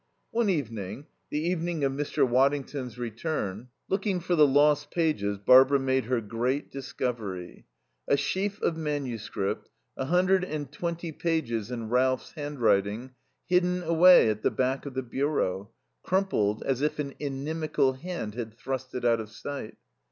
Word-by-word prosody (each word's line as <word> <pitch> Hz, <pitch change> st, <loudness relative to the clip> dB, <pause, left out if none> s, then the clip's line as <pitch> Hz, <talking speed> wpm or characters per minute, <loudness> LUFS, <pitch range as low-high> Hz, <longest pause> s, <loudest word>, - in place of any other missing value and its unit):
One 230 Hz, -2 st, +1 dB
evening, 115 Hz, -, -3 dB, 0.2 s
the -, -, -2 dB
evening 170 Hz, -1 st, -1 dB
of 135 Hz, -, +2 dB
Mr. 145 Hz, -1 st, +1 dB
Waddington's 135 Hz, -1 st, 0 dB
return, 115 Hz, -, -3 dB, 0.2 s
looking 195 Hz, -1 st, 0 dB
for 175 Hz, +1 st, 0 dB
the 150 Hz, -3 st, +6 dB
lost 145 Hz, +1 st, +3 dB
pages, 125 Hz, -13 st, 0 dB
Barbara 130 Hz, +7 st, +6 dB
made 130 Hz, -1 st, +1 dB
her 125 Hz, 0 st, 0 dB
great 120 Hz, +6 st, -2 dB
discovery: 115 Hz, -9 st, -5 dB, 0.4 s
a 140 Hz, -, +4 dB
sheaf 200 Hz, +6 st, -1 dB
of 165 Hz, -, +2 dB
manuscript, 135 Hz, -10 st, -3 dB, 0.3 s
a 135 Hz, -, -3 dB
hundred 180 Hz, +4 st, +3 dB
and 155 Hz, -5 st, -4 dB
twenty 170 Hz, -1 st, -4 dB
pages 145 Hz, -10 st, -1 dB
in 115 Hz, -3 st, -4 dB
Ralph's 130 Hz, +2 st, +1 dB
handwriting, 125 Hz, -, 0 dB, 0.3 s
hidden 180 Hz, 0 st, +2 dB
away 170 Hz, -2 st, +7 dB
at 105 Hz, 0 st, -5 dB
the -, -, +3 dB
back 130 Hz, +2 st, -1 dB
of 135 Hz, -, -8 dB
the 130 Hz, -, -1 dB
bureau, 120 Hz, -7 st, -1 dB, 0.3 s
crumpled 180 Hz, -, 0 dB
as 135 Hz, -1 st, -1 dB
if 150 Hz, +1 st, 0 dB
an 140 Hz, -2 st, -3 dB
inimical 145 Hz, 0 st, 0 dB
hand 145 Hz, -, -5 dB
had 115 Hz, -1 st, -6 dB
thrust 130 Hz, 0 st, -5 dB
it 125 Hz, -, -3 dB
out 115 Hz, -1 st, +4 dB
of 110 Hz, -1 st, -6 dB
sight. 110 Hz, +2 st, -7 dB
135 Hz, 150 wpm, -28 LUFS, 120-160 Hz, 0.4 s, away